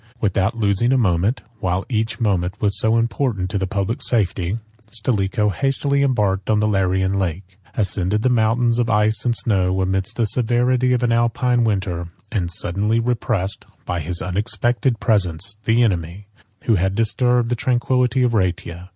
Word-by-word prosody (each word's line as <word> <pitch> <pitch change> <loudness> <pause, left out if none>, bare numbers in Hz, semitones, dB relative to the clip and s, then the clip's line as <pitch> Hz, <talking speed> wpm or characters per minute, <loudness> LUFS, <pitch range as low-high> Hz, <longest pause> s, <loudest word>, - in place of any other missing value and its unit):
Without 100 +1 0
losing 105 +2 +1
a 135 - +3
moment, 100 +1 +1 0.2
(while 95 0 -1
each 110 -2 -2
moment 100 -3 0
was 100 -2 0
so 110 +1 +2
important 115 -5 -1
to 100 - -1
the 95 - -1
public 100 +3 -2
safety,) 95 -3 0 0.3
Stilicho 105 -2 0
hastily 140 +4 0
embarked 105 -8 0
on 105 -1 +3
the 105 - +2
Larian 95 -1 +1
Lake, 95 +1 -4 0.2
ascended 100 0 0
the - - +3
mountains 120 0 +2
of 120 -1 +1
ice 110 0 +1
and 120 -1 +2
snow, 95 -4 +1
amidst 95 +3 -1
the 115 - +1
severity 125 +3 +1
of 125 0 0
an 120 - +2
Alpine 120 +1 +2
winter, 95 -5 -1 0.2
and 95 -7 -1
suddenly 100 +4 0
repressed, 115 -5 -2 0.2
by 90 - -2
his 85 +2 -1
unexpected 120 +6 0
presence, 100 -3 0
the 115 +2 +3
enemy, 90 -2 -2 0.4
who 115 -4 +2
had 95 +2 0
disturbed 120 +2 +1
the 120 - +1
tranquillity 125 +1 +1
of 120 -1 +1
Rhaetia. 90 -2 -2
105 Hz, 160 wpm, -20 LUFS, 95-120 Hz, 0.4 s, a